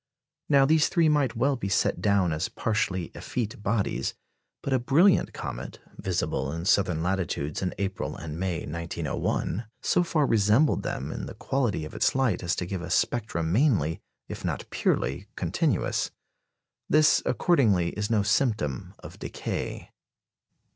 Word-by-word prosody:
Now 140 -2 +6
these 155 +2 +4
three 170 -4 +3
might 145 -5 +2
well 135 +4 +2
be 110 -6 -4
set 95 - +1
down 100 -5 +2
as 80 +4 -2
partially 95 -5 -1
effete 110 -4 -4
bodies; 105 -1 -1 0.5
but 140 - -1
a 130 - +3
brilliant 160 +10 +4
comet, - - -6 0.2
visible 65 +1 -2
in 85 +2 -4
southern 90 -5 +2
latitudes 85 -5 -1
in 95 - -2
April 100 -1 -3
and 80 -1 -6
May, 90 -3 -1
1901, 85 - -2 0.2
so - - +3
far 160 -4 +1
resembled 110 +6 +3
them - - -4
in - - -5
the - - -8
quality 120 - -1
of 75 - -9
its - - +1
light 130 -9 +1
as 85 -1 0
to 90 - -3
give 90 0 -4
a 85 - -6
spectrum 95 -9 0
mainly, 95 - +2 0.3
if - - -7
not - - -3
purely, - - 0
continuous. - - 0 0.8
This, 155 +1 +5
accordingly, 110 - +3
is 105 +3 -3
no 110 -3 +2
symptom 105 - 0
of - - -12
decay. - - -5
105 Hz, 150 wpm, -27 LUFS, 85-135 Hz, 0.8 s, Now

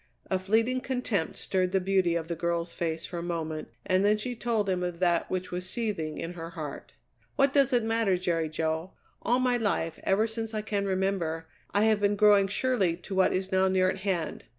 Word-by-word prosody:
A 190 - +2
fleeting 225 +7 +1
contempt 245 -10 -1
stirred 185 -1 0
the 190 - +3
beauty 185 -2 +2
of 165 -1 -2
the 170 - -3
girl's 170 0 -2
face 165 -1 -2
for 175 - -5
a - - -4
moment, 160 -2 -3 0.2
and 185 0 +2
then 210 +1 +4
she 245 +4 -4
told 225 -3 0
him 185 -2 0
of 180 -1 -3
that 175 -1 +1
which 185 0 -3
was 180 +1 -3
seething 190 -11 -2
in 170 +1 -4
her 165 -1 -7
heart. 155 -4 -7 0.4
"What 275 0 +3
does 275 -3 +4
it 245 -2 +3
matter, 225 -4 +1
Jerry 170 -3 0
Jo? 160 +3 -2 0.3
All 245 - +2
my 250 -1 +2
life, 195 -7 -1
ever 200 +3 +3
since 225 0 -5
I 215 - -2
can 205 -2 -1
remember, 185 -4 -1 0.2
I 205 - +2
have 220 -1 +3
been 205 0 +2
growing 205 -1 +5
surely 205 -6 +1
to 180 +3 -8
what 190 0 +4
is 190 0 -2
now 190 0 +3
near 185 0 +3
at 190 - -6
hand. 190 -4 -2
190 Hz, 215 wpm, -28 LUFS, 170-215 Hz, 0.4 s, growing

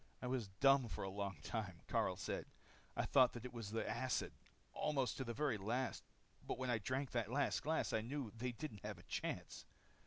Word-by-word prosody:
"I - - -5
was 125 -4 0
dumb 135 +6 +5
for - - -4
a 95 - -2
long 100 -2 -2
time," 95 -7 -3
Karyl - - +2
said. - - -2 0.5
"I - - +1
thought 130 -3 +6
that 120 0 -6
it 125 - -5
was 115 -4 -4
the 110 +1 -1
acid, 120 +4 0 0.4
almost 135 -4 +1
to 130 - -1
the 120 - -3
very 135 -5 +1
last. 120 +7 0 0.4
But - - -2
when 130 -1 0
I 115 - +2
drank 130 +6 -1
that 115 -4 0
last 140 +3 +2
glass, 160 +2 +1
I 110 - +3
knew 125 0 -3
they 125 +2 -1
didn't 120 -5 -6
have 105 -2 -3
a 90 - -13
chance. - - -3
120 Hz, 210 wpm, -41 LUFS, 105-130 Hz, 0.5 s, thought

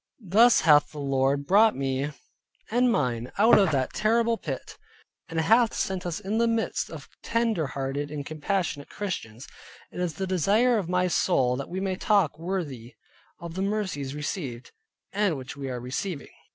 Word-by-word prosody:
Thus 225 +6 +6
hath 150 -2 +5
the 150 - -11
Lord 140 0 0
brought 210 +5 +5
me 135 +1 -2 0.6
and 245 +1 +3
mine 125 - -1
out 220 +3 +6
of 195 -4 +4
that 130 -3 -1
horrible 230 +2 +2
pit, - - -6 0.5
and 165 -1 -2
hath 225 +7 +3
set 185 -2 -2
us 170 +1 -3
in 210 +2 -2
the 235 - +3
midst 230 -1 -1
of - - -9
tender 230 -9 0
hearted 140 +2 -3
and 145 -1 -5
compassionate 155 -1 -2
Christians. 135 - -5 0.4
It - - -8
is 175 -3 -2
the 195 - -2
desire 210 +7 +2
of 180 -4 -5
my 180 0 +2
soul 135 -8 +2
that 135 +1 -5
we 185 - -3
may 190 -1 -2
walk 180 -8 +3
worthy 160 -10 -4 0.4
of 170 -1 -7
the 190 - -3
mercies 190 -10 -2
received, 145 -5 -5 0.4
and 200 -6 +1
which 130 +1 -8
we 140 -1 -5
are 125 -1 -4
receiving. 140 +6 -5
170 Hz, 170 wpm, -26 LUFS, 140-205 Hz, 0.6 s, Thus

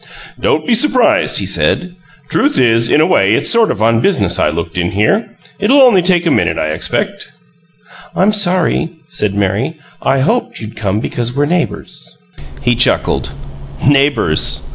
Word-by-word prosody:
"Don't 475 -3 0
be 245 - +1
surprised," 255 +2 +2
he - - 0
said. 180 0 0 0.3
"Truth 285 - 0
is, 115 -1 +2
in 150 - +3
a - - +3
way 105 - +2
it's - - +1
sort 230 -2 +4
of 105 - -2
on 115 0 +2
business 200 +6 0
I - - +2
looked 85 +1 -4
in 85 0 -1
here. 200 - 0 0.3
It'll 265 +7 +4
only 230 -8 +5
take 175 -1 +1
a 165 - +1
minute, - - 0
I 80 - -2
expect." 80 - -3 0.8
"I'm 200 +3 +2
sorry," 180 -4 0 0.2
said 105 - -2
Mary. 100 - -1 0.3
"I 135 0 0
hoped 230 - -1
you'd 110 -1 -9
come 105 0 -2
because 120 +1 -4
we're 145 +1 +1
neighbors." 170 +2 -4 0.5
He 120 - +2
chuckled. 120 - 0 0.6
"Neighbors! 140 - +1
145 Hz, 165 wpm, -14 LUFS, -, 0.8 s, only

